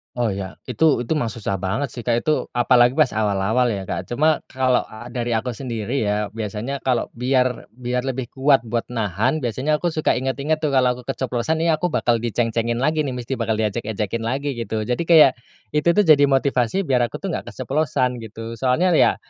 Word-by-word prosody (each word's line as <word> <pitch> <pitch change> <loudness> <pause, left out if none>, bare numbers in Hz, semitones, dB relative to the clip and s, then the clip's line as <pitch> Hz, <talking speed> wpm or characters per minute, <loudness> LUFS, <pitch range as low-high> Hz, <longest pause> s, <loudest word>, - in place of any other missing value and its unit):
Oh 120 -1 0
ya 95 -2 -5
itu 125 -1 +2
itu 160 - 0
mah 120 -7 -1
susah 100 -3 -3
banget 95 +10 -2
sih 120 0 -9
Kak 120 0 +1
itu 155 +3 0
apalagi 120 0 +4
pas 155 - +6
awal-awal 110 +3 +1
ya 95 -3 -4
Kak 95 +6 -5
cuma 155 +5 +2
kalau 130 -1 +1
a 110 +2 -11
dari 120 -1 -3
aku 115 +2 -1
sendiri 120 +1 -3
ya 105 0 0
biasanya 115 +5 -4
kalau 125 -3 +1
biar 125 0 0
biar 125 +1 -3
lebih 130 -2 -3
kuat 135 +1 +3
buat 115 +1 -1
nahan 110 - 0
biasanya 135 +4 -1
aku 175 - -1
suka 155 -2 +1
inget-inget 140 +4 -1
tuh 155 - 0
kalau 130 -3 +3
aku 125 - -14
keceplosan 135 +4 -1
nih 165 - +3
aku 180 - +1
bakal 120 -7 +1
diceng-cengin 115 0 -1
lagi 155 +4 0
nih 130 - -3
mesti 125 +1 -4
bakal 115 -1 0
diejek-ejekin 110 0 -2
lagi 135 +6 -2
gitu 115 -3 -3
jadi 125 +6 -2
kayak 165 -5 +6 0.4
itu 150 +2 0
tuh 210 - +5
jadi 145 -5 +6
motivasi 135 +5 +1
biar 125 -7 +2
aku - - -10
tuh - - -4
nggak - - -4
keceplosan 130 -4 -1
gitu. 115 0 -8
Soalnya 135 +8 +2
ya 165 - +4
125 Hz, 195 wpm, -21 LUFS, 115-140 Hz, 0.4 s, pas